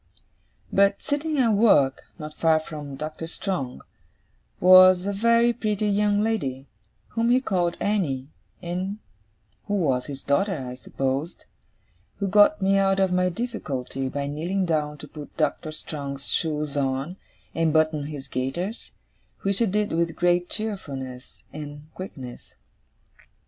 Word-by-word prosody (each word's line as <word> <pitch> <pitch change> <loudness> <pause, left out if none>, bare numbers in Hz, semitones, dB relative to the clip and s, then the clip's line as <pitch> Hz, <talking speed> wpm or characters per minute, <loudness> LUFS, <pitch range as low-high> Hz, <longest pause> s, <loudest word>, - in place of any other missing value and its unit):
But, 200 0 +3
sitting 300 +1 -1
at 245 -4 +4
work, 200 - +4
not 150 -1 -7
far 160 0 +3
from 150 -3 -7
Doctor 155 +3 -5
Strong, 165 -8 -4 0.8
was 185 0 +8
a 200 - -1
very 235 +3 +4
pretty 215 -2 -1
young 205 0 +2
lady 140 -13 -1 0.4
whom 230 +1 0
he 250 +1 +5
called 180 -8 0
Annie, 150 -11 -1 0.3
and 185 +4 -3 0.7
who 205 - 0
was 135 -10 +1
his 140 -2 -7
daughter, 185 +7 +1
I 125 -2 -5
supposed 135 +4 -3 0.7
who 200 - -1
got 205 0 +5
me 195 +1 +4
out 195 0 +2
of 190 -1 +2
my 180 0 +2
difficulty 140 - -4
by 140 +1 -3
kneeling 170 +7 -1
down 150 -3 -1
to 150 - -10
put 150 0 -11
Doctor 155 0 0
Strong's 140 -3 -6
shoes 150 -2 -1
on, 140 +5 -1 0.4
and 165 -1 +2
button 155 -2 +2
his 145 -3 -7
gaiters, 140 - -3 0.5
which 195 0 +1
she 230 - +3
did 210 +2 0
with 165 0 0
great 175 0 +2
cheerfulness 135 - -6
and 150 0 -8
quickness. 135 -10 -9
170 Hz, 140 wpm, -25 LUFS, 145-200 Hz, 0.8 s, was